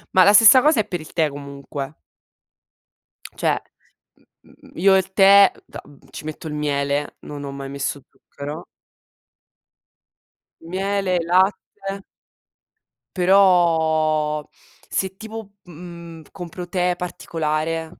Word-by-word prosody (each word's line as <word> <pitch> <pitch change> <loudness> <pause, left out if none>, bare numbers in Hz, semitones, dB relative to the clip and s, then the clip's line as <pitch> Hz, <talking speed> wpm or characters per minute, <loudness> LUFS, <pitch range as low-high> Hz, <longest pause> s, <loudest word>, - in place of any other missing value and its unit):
Ma 185 - +7
la 205 - +6
stessa 225 +5 +8
cosa 300 -3 +3
è - - -6
per 175 - -4
il 155 - -12
tè, 160 -3 +1
comunque. 140 0 -8 1.4
Cioè, - - 0 0.8
mhmm, - - -20
io 195 +2 +4
il 190 0 0
tè 195 +1 +7
da - - -10 0.3
ci - - -9
metto 155 +1 -7
il 150 - -5
miele, 145 -1 -2
non 145 -1 -8
ho 140 - -6
mai 140 0 -7
messo 140 +1 -4
zucchero. 145 +4 -9 2.0
Miele 190 +2 -1
e - - -3
latte 195 +2 0 1.1
Però 160 -5 +3 0.5
se 190 0 -2
tipo, 220 -1 -9
mhmm, 170 -1 -11
compro 175 -1 -8
tè 180 0 0
particolare, 165 -1 -3
170 Hz, 115 wpm, -21 LUFS, 150-190 Hz, 2.0 s, stessa